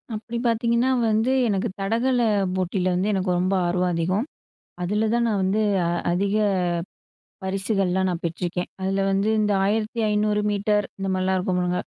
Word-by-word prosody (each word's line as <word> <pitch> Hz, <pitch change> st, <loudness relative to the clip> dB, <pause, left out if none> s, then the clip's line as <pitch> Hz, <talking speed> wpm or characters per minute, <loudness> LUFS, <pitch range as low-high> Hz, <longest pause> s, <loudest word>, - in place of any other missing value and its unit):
அப்டி 235 Hz, +2 st, -5 dB
பார்த்தீங்கன்னா 235 Hz, +2 st, +1 dB, 0.2 s
வந்து, 220 Hz, +4 st, +2 dB, 0.2 s
எனக்கு 205 Hz, +1 st, 0 dB
தடகள 235 Hz, +6 st, +1 dB, 0.4 s
போட்டில 185 Hz, 0 st, 0 dB
வந்து 195 Hz, +4 st, +1 dB
எனக்கு 190 Hz, -1 st, -1 dB
ரொம்ப 185 Hz, +2 st, +1 dB
ஆர்வம் 180 Hz, +1 st, +1 dB
அதிகம். 185 Hz, +7 st, 0 dB, 0.6 s
அதுல 210 Hz, +4 st, 0 dB
தான் 235 Hz, 0 st, +2 dB
நான் 205 Hz, -3 st, 0 dB
வந்து, 200 Hz, +3 st, +1 dB, 0.2 s
அ, -, -, 0 dB, 0.2 s
அதிக 200 Hz, +3 st, 0 dB, 1.1 s
பரிசுகள்லாம் 190 Hz, -1 st, 0 dB
நான் 175 Hz, -1 st, -4 dB
பெற்றுருக்கேன். 175 Hz, +2 st, -3 dB
அதுல 195 Hz, +1 st, 0 dB
வந்து 195 Hz, +2 st, +1 dB
இந்த 210 Hz, -1 st, +1 dB
1500 210 Hz, -1 st, 0 dB
மீட்டர் 205 Hz, 0 st, +1 dB
இந்த 195 Hz, 0 st, -3 dB
மாரிலாம் 185 Hz, 0 st, +1 dB
இருக்கும் 180 Hz, 0 st, -1 dB
பாருங்க. 180 Hz, 0 st, 0 dB
195 Hz, 145 wpm, -24 LUFS, 185-215 Hz, 1.1 s, வந்து